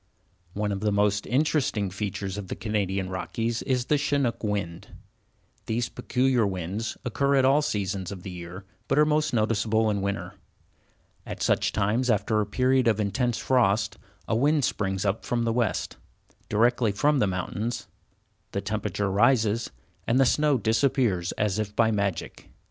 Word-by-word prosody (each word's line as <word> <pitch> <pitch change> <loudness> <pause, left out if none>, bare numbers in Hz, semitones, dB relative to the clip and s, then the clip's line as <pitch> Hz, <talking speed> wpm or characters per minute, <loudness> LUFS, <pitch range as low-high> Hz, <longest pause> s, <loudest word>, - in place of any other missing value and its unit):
One 105 0 -1
of 100 - -2
the 105 +1 0
most 100 0 +1
interesting 130 -7 +1
features 95 -1 -4
of 105 -2 -6
the - - -4
Canadian 100 -2 -1
Rockies 115 +5 -2
is 125 -3 0
the 150 +1 +2
Chinook 140 -5 0
wind. 100 -5 -3 0.8
These 115 +1 -1
peculiar 130 -2 +1
winds 95 +4 -4
occur 140 +4 +1
at 135 -1 +4
all 140 +3 +4
seasons 100 - -2
of 95 -3 -8
the 95 - -6
year 90 +2 -8 0.2
but 135 - +1
are 150 - +6
most 155 0 +1
noticeable 110 -1 +1
in 100 -1 -1
winter. 100 +1 -3 0.9
At - - -6
such - - +2
times, 115 +6 0
after 110 0 +2
a 105 - -2
period 130 +3 +2
of 110 -2 +2
intense 120 +3 0
frost, 110 -5 +1 0.3
a - - +1
wind 145 +3 +3
springs 95 -1 -1
up 100 +2 0
from 120 -1 -1
the 115 -1 0
west, 120 -4 -1 0.5
directly 115 +1 +2
from 145 +8 +2
the 105 - +3
mountains, 95 +5 -3 0.7
the 100 - -1
temperature 100 -1 -2
rises, 115 +1 +2 0.4
and 120 +3 +3
the 135 - +5
snow 150 +2 +3
disappears 115 -5 +1
as 105 -1 -1
if 105 -1 -3
by 115 0 +3
magic. 100 -5 -3
110 Hz, 160 wpm, -26 LUFS, 100-125 Hz, 0.9 s, are